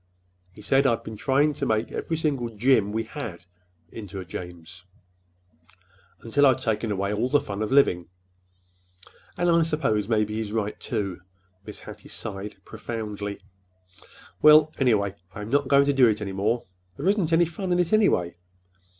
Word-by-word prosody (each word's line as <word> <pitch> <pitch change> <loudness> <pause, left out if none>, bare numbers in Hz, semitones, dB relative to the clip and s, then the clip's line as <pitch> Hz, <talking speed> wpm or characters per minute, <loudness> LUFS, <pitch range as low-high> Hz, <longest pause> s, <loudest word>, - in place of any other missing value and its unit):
He 105 - -14
said 135 +3 +3
I'd 115 -3 0
been 110 - -7
trying 140 +7 +2
to - - -3
make 110 +1 0
every 165 - -3
single 140 -7 -1
'Jim' 110 -1 +2
we 110 +1 -1
had 110 - -7 0.5
into 100 -3 -8
a 95 - -7
'James,' 90 0 -9 1.4
until 140 +5 +3
I'd 130 - +4
taken 115 -3 -1
away 100 +1 -1
all 115 +5 0
the 145 - +4
fun 100 -6 -6
of 110 - -2
living. 90 -12 +3 1.3
And 175 0 +1
I 170 -1 +4
suppose 135 -10 0
maybe 105 -2 +1
he's 110 -2 -3
right, 105 -2 -2
too." 100 -6 -3 0.5
Mrs. 105 - -8
Hattie - - -11
sighed 100 0 -6
profoundly. 105 -3 -6 1.0
"Well, 155 0 +7
anyhow, 110 -7 +2 0.2
I'm 105 0 -6
not 140 -1 +2
going 140 0 +5
to 140 - +2
do 130 -3 +5
it 105 -2 +1
any 100 -2 -4
more. 110 +5 0 0.3
There 150 - -3
isn't 195 -5 +2
any 170 +1 +5
fun 180 +3 -5
in 175 - +3
it, 180 +2 0
anyway. 90 - +3
115 Hz, 165 wpm, -25 LUFS, 105-140 Hz, 1.4 s, Well